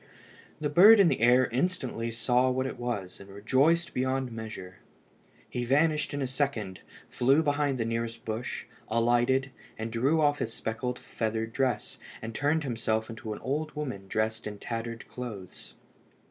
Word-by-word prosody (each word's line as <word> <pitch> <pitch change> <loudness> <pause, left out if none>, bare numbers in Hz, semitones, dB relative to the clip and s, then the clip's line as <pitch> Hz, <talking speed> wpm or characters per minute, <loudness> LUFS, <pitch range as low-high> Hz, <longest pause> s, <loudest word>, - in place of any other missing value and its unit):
The 150 - 0
bird 200 +9 +8
in 190 -4 +7
the 135 - 0
air 125 +2 +5
instantly 125 -5 -1
saw 125 +3 +2
what 130 +1 0
it 130 - -5
was, 110 -7 -4
and 100 - -12
rejoiced 135 - +2
beyond 130 0 -1
measure. 110 -5 -7 0.7
He 120 - -3
vanished 150 +4 +2
in 145 -1 -2
a - - 0
second, 130 -8 -2 0.3
flew 135 +6 +3
behind 145 -2 +1
the 115 - -1
nearest 115 0 -3
bush, 110 +3 -4 0.2
alighted, 120 +4 +2 0.3
and 115 +1 -4
drew 135 +8 +2
off 145 -1 +3
his 115 - -3
speckled 125 +3 -3
feather 110 0 -2
dress, 125 +3 -2 0.2
and 115 +1 -6
turned 150 +5 +1
himself 110 -3 -1
into 110 -1 -7
an 105 - -5
old 150 +3 -2
woman 125 -10 -5
dressed 110 +2 -1
in 105 -1 -6
tattered 115 +1 -5
clothes. 110 -7 -8
120 Hz, 160 wpm, -29 LUFS, 115-140 Hz, 0.7 s, bird